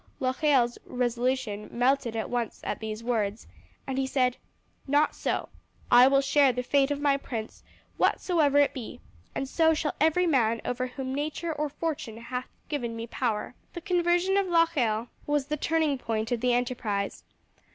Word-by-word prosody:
Locheil's 260 -2 +2
resolution 245 -3 -1
melted 245 -1 +1
at 220 - -2
once 240 -2 -3
at - - -3
these 220 0 -5
words, 220 -3 -1 0.4
and 265 0 -2
he 265 - 0
said: 255 -2 +1 0.5
"Not 290 +2 +3
so. - - -2 0.4
I 245 +1 +8
will 275 0 +4
share 275 0 +4
the 250 +1 -3
fate 275 +2 +2
of 290 -1 -1
my 285 -1 +3
prince 225 -5 -6 0.4
whatsoever 305 -6 +2
it 285 -1 +4
be, 245 -4 -7 0.4
and 270 - -2
so 320 +3 +3
shall 300 -1 -1
every 320 +4 +4
man 230 -8 +2
over 255 +1 -1
whom 260 +1 -5
nature 310 +4 -2
or 300 0 -2
fortune 290 -7 -4
hath 250 +2 -5 0.2
given 240 -6 -3
me 230 0 -5
power." 230 -2 -2 0.2
The 345 - -6
conversion 355 +1 +2
of 395 -1 +2
Locheil 275 -10 +2 0.2
was 290 -2 +1
the 300 +2 -2
turning 310 -2 +1
point 225 -1 -2
of 240 -2 0
the 250 0 +2
enterprise. 240 -5 -1
260 Hz, 165 wpm, -28 LUFS, 235-295 Hz, 0.5 s, I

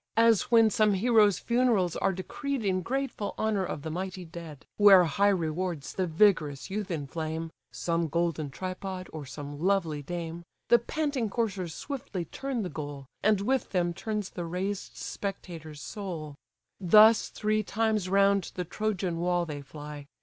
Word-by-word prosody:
As 230 -2 +4
when 225 -2 +6
some 210 -1 +3
hero's 210 -2 +4
funerals 235 -8 +2
are - - +1
decreed 230 +7 -4
In 185 -1 +1
grateful 260 -3 -3
honour 215 -3 +1
of 155 -5 -4
the 160 - -4
mighty 185 +1 -4
dead; 165 -4 -10
Where 200 -3 +8
high 175 +5 +2
rewards 170 -3 -2
the 185 -1 -1
vigorous 160 -5 +2
youth 205 0 -3
inflame 160 +1 -4 0.2
(Some 170 -1 -1
golden 165 -2 -1
tripod, 185 +3 -5
or 150 -3 -6
some 145 +1 -7
lovely 170 -4 +1
dame) 170 +2 -5 0.3
The 240 - +7
panting 280 -2 -1
coursers 195 -7 -2
swiftly 265 - -5
turn 265 - -3
the - - -2
goal, 145 -2 -6 0.2
And 210 -2 +3
with 260 +5 0
them 175 -2 +1
turns 210 +1 -3
the 175 - -5
raised 190 +4 -4
spectator's 165 -6 -6
soul: 175 -8 -6 0.5
Thus 215 +4 +6
three 215 0 0
times 215 -2 0
round 200 -1 +3
the 180 - -3
Trojan 185 -3 -2
wall 175 0 +1
they 150 -3 -6
fly. 145 0 -9
185 Hz, 155 wpm, -29 LUFS, 165-215 Hz, 0.5 s, Where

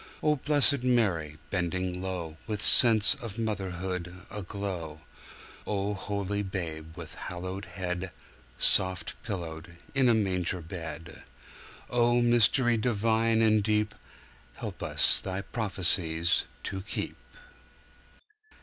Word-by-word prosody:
O 150 -1 +3
blessed 145 -1 +4
Mary 95 -12 0
bending 90 0 -2
lowWith 95 +3 -6
sense 110 -3 +8
of 115 -2 -8
motherhood 90 -4 -4
aglow!O 100 +1 -7
holy 100 0 -3
Babe 80 -4 -6
with 85 -3 -9 0.2
haloed 95 +3 -6
headSoft 90 -2 0
pillowed 85 -2 -7 0.2
in 135 -2 +3
a 115 - +4
manger 95 -4 -1
bed!O 95 +8 -5
Mystery 120 0 +3
divine 115 0 +1
and 110 -1 +3
deepHelp 105 - -5
us - - +5
Thy 95 +1 -5
prophecies 90 -6 +1 0.2
to 95 - -5
keep! 100 - -5
95 Hz, 90 wpm, -28 LUFS, 85-110 Hz, 0.2 s, sense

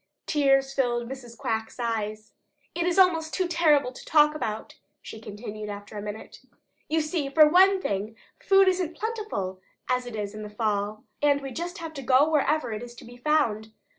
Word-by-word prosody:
Tears 270 -2 +2
filled 240 -3 0
Mrs. 245 -2 -9
Quack's 225 -3 -3
eyes. 215 -2 -3 0.4
"It 345 0 -1
is 360 - 0
almost 330 -4 +3
too 370 -2 0
terrible 310 -6 +3
to - - -12
talk 300 -1 +4
about," 220 -8 -5 0.2
she 220 - -10
continued 210 0 -7
after 205 +1 -8
a 205 - -4
minute. 210 +1 -8 0.5
"You 320 +1 +2
see, 305 -2 -2
for 305 +2 +7
one 380 +4 +5
thing, 205 - -3 0.2
food 390 0 +5
isn't 365 -3 +1
as - - -22
plentiful 420 - -4 0.3
as 250 -1 0
it 240 - -6
is 205 -1 -4
in 215 - -7
the 210 - -7
fall, 210 -1 -2 0.2
and 290 -1 +4
we 270 -1 -7
just 345 +7 -5
have 330 -2 -7
to 280 - -6
go 265 +3 +4
wherever 305 -3 +1
it 215 - -5
is 240 0 -9
to - - -12
be 240 +1 -12
found. 235 -6 0
265 Hz, 195 wpm, -26 LUFS, 215-315 Hz, 0.5 s, for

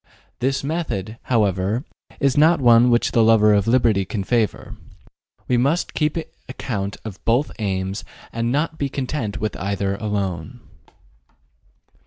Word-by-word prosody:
This 135 +2 0
method, 120 - -3
however, 105 - +1 0.3
is 140 -2 +2
not 160 +3 +5
one 120 -1 +6
which 120 0 +2
the 115 - +3
lover 110 -1 +5
of 100 0 +2
liberty 115 -5 +3
can 100 +2 -4
favor. 115 0 -1 0.7
We 125 - +2
must 140 +8 +1
keep 150 +1 0 0.3
account 100 -6 -4
of 100 -4 -8
both 120 +6 +1
aims 95 -1 -2 0.3
and 115 +1 -1
not 160 +4 -1
be 140 - -1
content 130 -5 -3
with 105 -5 -2
either 100 +3 -1
alone. 105 +1 -3
115 Hz, 135 wpm, -21 LUFS, 100-130 Hz, 0.7 s, one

